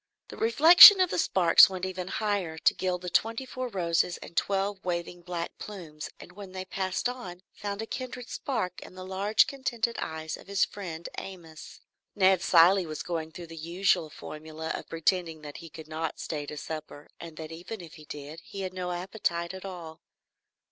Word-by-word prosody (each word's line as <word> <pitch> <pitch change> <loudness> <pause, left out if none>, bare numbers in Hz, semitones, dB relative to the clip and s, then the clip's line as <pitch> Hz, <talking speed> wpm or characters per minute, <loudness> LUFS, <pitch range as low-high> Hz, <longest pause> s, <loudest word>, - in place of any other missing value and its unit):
The - - -10
reflection 330 - +10
of 370 -2 +3
the - - 0
sparks 180 - +6
went 185 -1 -4
even 185 -1 -5
higher 200 -6 -2
to - - +3
gild 180 -1 -2
the 180 - -3
twenty 225 +7 +1
four 255 0 -5
roses 175 -4 0
and 170 - -12
twelve 195 0 -1
waving 175 0 -3
black 170 -1 -5
plumes, 165 -7 -8
and - - -12
when 190 0 -11
they 185 0 -5
passed 190 +3 -2
on, 215 -8 -7
found 205 +1 -5
a - - -5
kindred 250 0 -6
spark 185 -10 -3
in - - -12
the 185 0 -8
large 200 +3 +3
contented 240 -4 -2
eyes 160 0 -4
of - - -16
his 200 -1 +2
friend 170 -5 -7
Amos. 165 -5 -11 0.3
Ned 190 -2 +4
Cilley 180 0 +5
was 155 -1 -5
going 160 -2 -4
through 175 +2 -9
the 165 0 -11
usual 170 0 0
formula 155 +2 -8
of - - -7
pretending 165 -1 -1
that 145 -1 -8
he 165 -2 -11
should 160 -2 -9
not 160 +1 -4
stay 145 -2 -4
to 150 - -7
supper, 155 -1 -7
and 165 -2 -10
that 160 0 -7
even 175 +7 -7
if 170 -3 -11
he 155 - -13
did, 150 +3 -8
he 195 - -8
had 185 -1 -4
no 180 -1 -4
appetite 175 -1 -2
at 190 +1 -8
all. 170 -4 -8
180 Hz, 190 wpm, -28 LUFS, 165-200 Hz, 0.3 s, reflection